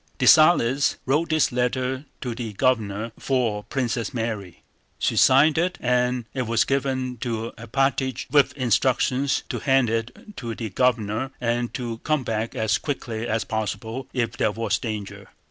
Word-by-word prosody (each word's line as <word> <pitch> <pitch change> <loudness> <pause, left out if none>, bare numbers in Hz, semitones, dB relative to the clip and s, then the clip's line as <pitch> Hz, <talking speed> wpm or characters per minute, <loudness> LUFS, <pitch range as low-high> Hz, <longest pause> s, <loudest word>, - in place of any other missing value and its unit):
Dessalles 145 -4 +5
wrote 150 +6 +1
this 155 -3 +2
letter 130 +2 -1 0.2
to 125 -3 -3
the 115 -2 -5
Governor 110 -2 0
for 120 -6 0
Princess 125 -3 -2
Mary, 110 -6 -4 0.3
she - - 0
signed 150 +4 +5
it, 180 +1 0
and 125 -1 +1
it 130 -3 -2
was 115 0 +2
given 130 -2 -1
to 115 -1 -3
Alpátych 130 +3 -1
with 145 -2 +5
instructions 130 +2 +1
to - - -3
hand 135 -4 +2
it 115 - -4
to 115 -3 -5
the 110 -3 -5
Governor 120 +1 +1
and 120 0 -1
to 120 -3 -4
come 155 -1 0
back 110 -1 -3
as 110 0 +1
quickly 120 -5 -4
as 115 -1 0
possible 110 +3 -4
if 115 -3 -1
there - - +1
was 115 +2 -1
danger. 105 -4 -6
125 Hz, 150 wpm, -24 LUFS, 115-135 Hz, 0.3 s, Dessalles